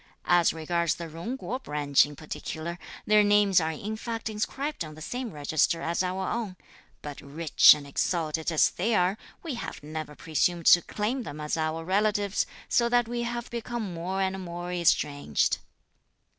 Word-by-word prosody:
As 175 Hz, -1 st, +4 dB
regards 170 Hz, +1 st, 0 dB
the 170 Hz, -, -6 dB
Jung 170 Hz, +11 st, -5 dB
kuo 260 Hz, 0 st, -4 dB
branch 145 Hz, -, +2 dB
in 145 Hz, -, -10 dB
particular, 160 Hz, +3 st, -6 dB, 0.3 s
their 210 Hz, 0 st, +5 dB
names 205 Hz, -3 st, +4 dB
are 160 Hz, -, 0 dB
in 200 Hz, +7 st, -4 dB
fact 225 Hz, 0 st, -4 dB
inscribed 265 Hz, -, -3 dB
on 155 Hz, -1 st, -9 dB
the -, -, -12 dB
same 245 Hz, +5 st, -4 dB
register 155 Hz, +1 st, 0 dB
as 170 Hz, +2 st, 0 dB
our 185 Hz, +1 st, -2 dB
own, 220 Hz, -6 st, -3 dB, 0.5 s
but 145 Hz, -1 st, -7 dB
rich 150 Hz, +2 st, +6 dB
and 145 Hz, -1 st, -8 dB
exalted 160 Hz, +2 st, -1 dB
as 160 Hz, -, +4 dB
they 220 Hz, +5 st, 0 dB
are, 180 Hz, 0 st, +2 dB, 0.3 s
we 325 Hz, -5 st, -4 dB
have 235 Hz, -, -6 dB
never 155 Hz, 0 st, -6 dB
presumed 165 Hz, +2 st, 0 dB
to 175 Hz, -, +8 dB
claim 220 Hz, +9 st, -2 dB
them 155 Hz, -10 st, -7 dB
as 150 Hz, 0 st, -2 dB
our 160 Hz, 0 st, -2 dB
relatives, 205 Hz, +1 st, +1 dB, 0.2 s
so 235 Hz, -1 st, +2 dB
that 240 Hz, -1 st, +3 dB
we 240 Hz, 0 st, -3 dB
have 235 Hz, 0 st, -4 dB
become 235 Hz, -4 st, -4 dB
more 185 Hz, +3 st, -2 dB
and 190 Hz, 0 st, -2 dB
more 175 Hz, 0 st, -6 dB
estranged." 145 Hz, -, +1 dB
175 Hz, 170 wpm, -27 LUFS, 155-215 Hz, 0.5 s, to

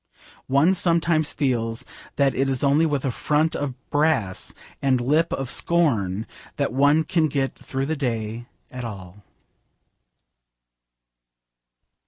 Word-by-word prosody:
One 140 Hz, +7 st, +4 dB
sometimes 170 Hz, -3 st, +2 dB
feels 115 Hz, -5 st, -1 dB, 0.3 s
that 140 Hz, -1 st, +3 dB
it 135 Hz, +1 st, 0 dB
is 130 Hz, 0 st, 0 dB
only 145 Hz, +4 st, +4 dB
with 145 Hz, -3 st, -1 dB
a 130 Hz, -, +1 dB
front 150 Hz, +5 st, +1 dB
of 140 Hz, -3 st, -3 dB, 0.2 s
brass 145 Hz, -11 st, +1 dB, 0.3 s
and 130 Hz, -2 st, +2 dB
a -, -, -3 dB
lip 150 Hz, +6 st, +2 dB
of 135 Hz, -2 st, -3 dB
scorn 115 Hz, -, +1 dB, 0.3 s
that 140 Hz, -3 st, -1 dB
one 145 Hz, +4 st, +4 dB
can 160 Hz, 0 st, +1 dB
get 135 Hz, -2 st, -1 dB
through 135 Hz, 0 st, -4 dB
the 160 Hz, +3 st, -1 dB
day 115 Hz, -4 st, -3 dB, 0.2 s
at 125 Hz, -1 st, -6 dB
all. 100 Hz, -3 st, -8 dB
135 Hz, 130 wpm, -23 LUFS, 120-155 Hz, 0.3 s, One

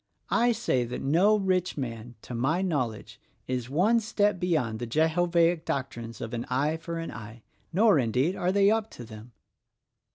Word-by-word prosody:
I 240 Hz, +1 st, +3 dB
say 130 Hz, -, 0 dB
that 120 Hz, +1 st, -6 dB
no 180 Hz, +10 st, +4 dB
rich 185 Hz, -4 st, 0 dB
man, 120 Hz, -3 st, -6 dB
to -, -, -8 dB
my 145 Hz, +10 st, 0 dB
knowledge, 130 Hz, -, -3 dB, 0.3 s
is 125 Hz, -1 st, -3 dB
one 195 Hz, -, +3 dB
step 210 Hz, -3 st, 0 dB
beyond 150 Hz, -12 st, 0 dB
the 120 Hz, -, -4 dB
Jehovaic 165 Hz, +4 st, +2 dB
doctrines 120 Hz, -6 st, -4 dB
of 115 Hz, -, -5 dB
an 120 Hz, 0 st, -2 dB
eye 145 Hz, +5 st, 0 dB
for 165 Hz, +1 st, -6 dB
an 165 Hz, 0 st, -5 dB
eye 110 Hz, 0 st, -10 dB
— -, -, -40 dB
nor, 200 Hz, -1 st, +4 dB
indeed, 130 Hz, -, +1 dB
are 180 Hz, +1 st, 0 dB
they 200 Hz, +1 st, +4 dB
up 220 Hz, 0 st, 0 dB
to 120 Hz, -, -10 dB
them." 110 Hz, +1 st, -12 dB
155 Hz, 175 wpm, -27 LUFS, 120-185 Hz, 0.3 s, no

